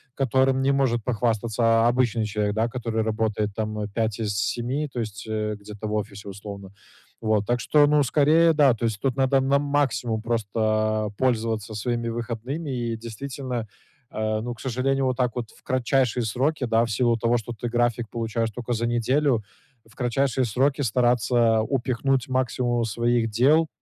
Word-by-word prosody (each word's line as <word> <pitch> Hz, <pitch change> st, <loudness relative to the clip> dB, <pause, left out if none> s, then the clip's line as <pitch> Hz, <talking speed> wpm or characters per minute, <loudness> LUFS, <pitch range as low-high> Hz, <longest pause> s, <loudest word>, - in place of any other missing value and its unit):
которым 130 Hz, 0 st, +2 dB
не 135 Hz, +1 st, +3 dB
может 130 Hz, -5 st, +1 dB
похвастаться, 115 Hz, -1 st, -1 dB
а, 115 Hz, 0 st, +4 dB
обычный 120 Hz, -2 st, +1 dB
человек, 105 Hz, -1 st, -1 dB
да, 110 Hz, +2 st, +1 dB
который 115 Hz, -2 st, -2 dB
работает 110 Hz, -1 st, -1 dB
там, 110 Hz, -1 st, -3 dB
э, 105 Hz, -, -2 dB
5 110 Hz, -1 st, -1 dB
из 105 Hz, -2 st, -1 dB
7, 125 Hz, +7 st, -1 dB
то 120 Hz, -, -3 dB
есть, 105 Hz, -3 st, -5 dB
э, 105 Hz, -1 st, -2 dB
где-то 105 Hz, +1 st, -7 dB
в 105 Hz, -, -3 dB
офисе 105 Hz, -1 st, -4 dB
условно. 100 Hz, -1 st, -9 dB, 0.5 s
Вот. 110 Hz, -2 st, +1 dB
Так 120 Hz, 0 st, +1 dB
что, 145 Hz, +3 st, +4 dB
ну, 150 Hz, 0 st, +4 dB
скорее 155 Hz, +5 st, +4 dB
да. 145 Hz, -4 st, +5 dB
То 115 Hz, +1 st, -3 dB
есть 110 Hz, -3 st, -1 dB
тут 130 Hz, -3 st, 0 dB
надо 135 Hz, 0 st, +3 dB
на 135 Hz, +1 st, +3 dB
максимум 140 Hz, -6 st, 0 dB
просто 110 Hz, -1 st, 0 dB
пользоваться 115 Hz, -4 st, 0 dB
своими 120 Hz, +2 st, -2 dB
выходными. 120 Hz, +6 st, -4 dB
И 120 Hz, -3 st, -2 dB
действительно, 120 Hz, +1 st, -5 dB, 0.4 s
а, 110 Hz, 0 st, -2 dB
ну, 120 Hz, +2 st, -4 dB
к 120 Hz, -, -16 dB
сожалению, 135 Hz, +2 st, 0 dB
вот 130 Hz, -1 st, 0 dB
так 125 Hz, -2 st, +1 dB
вот 120 Hz, -3 st, -4 dB
в -, -, -22 dB
кратчайшие 130 Hz, -1 st, +1 dB
сроки, 130 Hz, +6 st, 0 dB
да. 115 Hz, -1 st, +3 dB
В 115 Hz, -, -3 dB
силу 120 Hz, +1 st, +2 dB
того, 115 Hz, +1 st, +2 dB
что 115 Hz, +1 st, -6 dB
ты 120 Hz, +2 st, -5 dB
график 120 Hz, -1 st, 0 dB
получаешь 115 Hz, 0 st, -2 dB
тока 120 Hz, +2 st, -4 dB
за 115 Hz, 0 st, -1 dB
неделю, 120 Hz, +1 st, +1 dB, 0.4 s
в 110 Hz, -, -22 dB
кратчайшие 130 Hz, +1 st, 0 dB
сроки 135 Hz, +6 st, +1 dB
стараться 120 Hz, -1 st, +2 dB
упихнуть 130 Hz, +1 st, 0 dB
максимум 125 Hz, -2 st, 0 dB
своих 120 Hz, +1 st, +1 dB
дел, 140 Hz, +9 st, +4 dB
120 Hz, 175 wpm, -24 LUFS, 110-130 Hz, 0.5 s, да